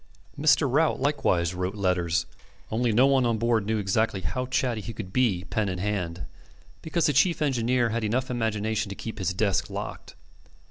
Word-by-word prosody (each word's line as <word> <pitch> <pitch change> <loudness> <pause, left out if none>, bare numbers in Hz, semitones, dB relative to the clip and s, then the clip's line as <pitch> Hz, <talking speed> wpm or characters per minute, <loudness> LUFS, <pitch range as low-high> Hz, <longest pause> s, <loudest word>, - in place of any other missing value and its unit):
Mr. - - +3
Rout - - +2
likewise 85 -1 +1
wrote 90 +2 -3
letters; 90 -4 0 0.5
only 115 +1 +1
no 120 +5 +5
one 135 -1 +3
on 115 -2 +1
board 115 -2 +1
knew 110 -1 0 0.4
how 125 0 -2
chatty 125 -3 0
he 115 - -6
could 95 -3 -8
be 110 -9 +2
pen 110 -3 0
in 90 - -3
hand, 90 -4 -3 0.6
because 165 0 0
the 150 - +3
chief 165 +6 +3
engineer 125 -4 +1
had 115 +1 -2
enough 125 +5 -1
imagination 110 -3 -1
to 100 - -6
keep 110 +1 -7
his 95 -1 0
desk 100 -1 0
locked. - - -7
110 Hz, 175 wpm, -26 LUFS, 95-125 Hz, 0.6 s, no